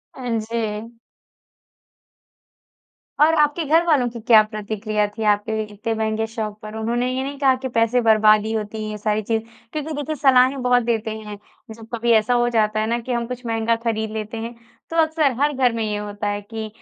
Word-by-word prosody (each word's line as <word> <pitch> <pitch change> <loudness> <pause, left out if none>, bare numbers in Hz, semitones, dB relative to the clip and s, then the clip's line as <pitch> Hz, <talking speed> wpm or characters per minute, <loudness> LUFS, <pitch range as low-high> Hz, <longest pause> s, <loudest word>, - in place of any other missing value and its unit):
हाँ 250 -2 -6
जी। 220 0 -4 2.3
और 310 +2 +5
आपके 300 +3 +2
घरवालों 310 -4 +3
की 235 0 -8
क्या 220 -1 +6
प्रतिक्रिया 215 0 -2
थी 210 +2 -7
आपके 220 +1 -1
इतने 210 +2 -4
महँगे 220 0 -1
शौक 215 -2 -5
पर? 215 0 -8
उन्होंने 240 +3 -1
ये 260 - -1
नहीं 280 +1 -5
कहा 270 -2 +4
कि 260 +1 -5
पैसे 230 +1 +2
बर्बादी 215 -1 +4
होती 215 0 -3
हैं 215 - -4
ये 210 - -5
सारी 210 +1 0
चीज़ें? 220 +1 -1 0.3
क्योंकि 310 0 -3
देखिए 295 +1 -3
सलाहें 265 -1 +4
बहुत 250 -1 +3
देते 225 -1 -1
हैं 210 -1 -8 0.4
जब 225 0 -13
कभी 235 0 +1
ऐसा 220 +2 +3
हो 240 0 +2
जाता 215 -2 +1
है 215 - 0
ना 235 +1 0
कि 240 +2 -6
हम 235 -1 -1
कुछ 250 0 -7
महँगा 225 0 +1
ख़रीद 220 -2 -1
लेते 220 +1 -5
हैं। 230 +1 -5 0.4
तो 330 - -6
अक्सर 315 -3 +2
हर 295 +1 +3
घर 255 -3 +2
में 230 -1 -2
ये 210 -1 -2
होता 205 0 -4
है 205 0 -2
कि 220 +1 -6
225 Hz, 195 wpm, -21 LUFS, 215-250 Hz, 2.3 s, क्या